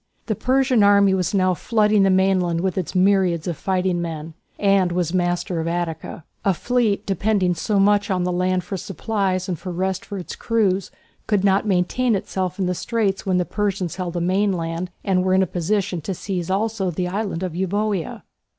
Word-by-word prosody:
The 220 - 0
Persian 255 +1 +2
army 200 -1 +5
was 185 -3 0
now 185 -2 +2
flooding 210 +1 +2
the 195 - +4
mainland 185 -3 +2
with 185 -1 -1
its 185 0 -3
myriads 185 -3 +3
of 175 - -2
fighting 185 0 0
men, 160 -1 -5 0.2
and 195 -3 +3
was 175 -1 -1
master 175 -1 0
of 160 - -2
Attica. 170 -1 -3 0.2
A 195 -2 +2
fleet, 235 -1 0
depending 195 -1 +1
so 200 +5 0
much 205 +1 +3
on 185 -2 0
the 180 - 0
land 180 0 0
for 195 +2 -5
supplies 190 0 -2
and 175 -4 -3
for 185 - -6
rest 185 +1 -2
for 200 - -7
its 180 - -6
crews, 200 -5 0 0.4
could 205 -3 +1
not 195 +2 +2
maintain 210 +6 +1
itself 185 -1 -3
in 190 - 0
the 180 - 0
straits 200 0 -1
when 185 -1 +2
the 180 - +1
Persians 195 -4 -2
held 180 -2 -3
the 175 - -2
mainland 180 -2 0
and 185 -2 +1
were 185 0 +2
in 190 - +4
a - - +1
position 185 +1 -1
to 190 +5 -4
seize 180 -2 -4
also 205 0 0
the 180 +1 -2
island 190 -2 -3
of 180 -3 -3
Euboea. 190 0 -2
190 Hz, 195 wpm, -22 LUFS, 180-200 Hz, 0.4 s, army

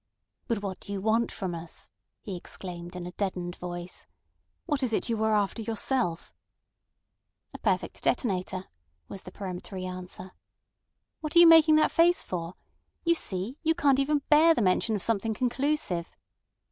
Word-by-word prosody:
"But 220 -3 -1
what 190 -2 -4
do - - -9
you 200 - -2
want 220 +3 +1
from 185 -4 -4
us?" 165 0 -7 0.3
he 195 - -5
exclaimed 175 0 -6
in 180 -1 -5
a 180 - -6
deadened 180 -2 -3
voice. 175 0 -5 0.6
"What 290 -4 -1
is 250 -4 0
it 220 - 0
you 225 -1 0
are 220 0 +3
after 205 +2 0
yourself?" 220 -5 -1 1.2
"A - - -8
perfect - - -1
detonator," 185 -4 0 0.4
was 195 - -8
the 180 - -11
peremptory 185 0 -6
answer. 185 0 -6 0.9
"What 310 +1 -5
are - - +9
you 345 - +10
making 325 -1 +8
that 310 - +4
face 345 +1 +4
for? 170 -1 -5 0.5
You 335 - +5
see, 210 - -2
you 325 0 +2
can't 280 -5 +3
even 285 +1 +1
bear 320 +2 +6
the - - +1
mention 200 +4 +2
of 200 - -2
something 225 0 0
conclusive." 250 - 0
205 Hz, 160 wpm, -28 LUFS, 180-275 Hz, 1.2 s, you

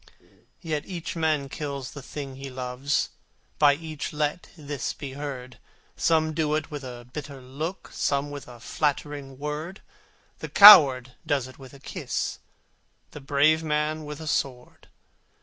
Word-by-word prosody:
Yet 155 -3 -3
each 175 -3 -5
man 155 -4 0
kills 140 -2 -5
the 145 - -9
thing 135 0 -7
he 135 0 -7
loves, 130 +2 -2 0.5
By 145 -1 +6
each 155 -2 -6
let 150 +2 -2
this 145 -3 -4
be 140 -3 -7
heard, 130 -3 -7 0.4
Some 160 -1 +2
do 155 -1 0
it 155 +1 -3
with 145 -2 -6
a 120 -2 -9
bitter 145 -2 -7
look, 145 +8 -6
Some 140 0 -1
with 145 -2 -8
a 120 -1 -12
flattering 145 0 -2
word, 150 +7 -5 0.6
The - - -6
coward 140 -12 +9
does 145 -5 0
it 130 - -15
with 135 0 -12
a - - -14
kiss, - - -4 0.7
The 150 - -10
brave 145 +3 +3
man 155 0 -1
with 150 0 -7
a 160 - -7
sword! 130 -4 -3
145 Hz, 150 wpm, -26 LUFS, 135-155 Hz, 0.7 s, coward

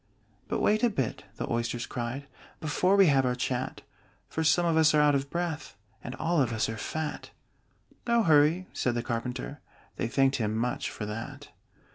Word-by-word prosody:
"But - - -1
wait 215 +1 +3
a 240 - +4
bit," 135 - -3
the - - -4
Oysters 120 0 -1
cried, 125 +3 -4 0.3
"Before 180 +5 +2
we 195 -1 +7
have 140 -5 +4
our 125 -1 +1
chat; 125 0 -3 0.4
For 160 - -2
some 165 +3 +4
of 165 -1 +2
us 160 -1 +5
are - - +5
out 150 -1 +5
of 140 0 0
breath, 170 -2 -3 0.3
And 125 - -6
all 170 -2 +1
of 125 -3 +1
us 110 -1 0
are 115 - -3
fat!" 150 +8 -4 0.8
"No 235 -1 +4
hurry!" 160 +2 +4
said 120 -1 0
the 120 - -1
Carpenter. 125 +3 -4 0.4
They - - -1
thanked 135 +2 +2
him 110 -2 -1
much 125 +4 -1
for 105 - -6
that. 105 +2 -6
140 Hz, 185 wpm, -29 LUFS, 120-160 Hz, 0.8 s, we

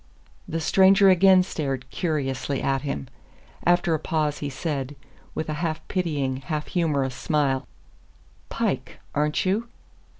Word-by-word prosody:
The 165 - -2
stranger 190 +4 +6
again 185 0 +6
stared 135 -8 -3
curiously 135 -2 -1
at 135 -1 0
him. 135 - -4 0.6
After 175 -1 +3
a 160 - +1
pause 155 -2 -1
he 145 - -3
said, 140 -1 -3 0.4
with 155 - -2
a 155 - -2
half 160 -2 -3
pitying, 145 -8 -1
half 150 +2 -3
humorous 145 -7 0
smile: 140 -2 0 0.8
"Pike - - -2 0.2
aren't 150 +3 +1
you?" 210 +5 0
150 Hz, 130 wpm, -25 LUFS, 135-175 Hz, 0.8 s, stranger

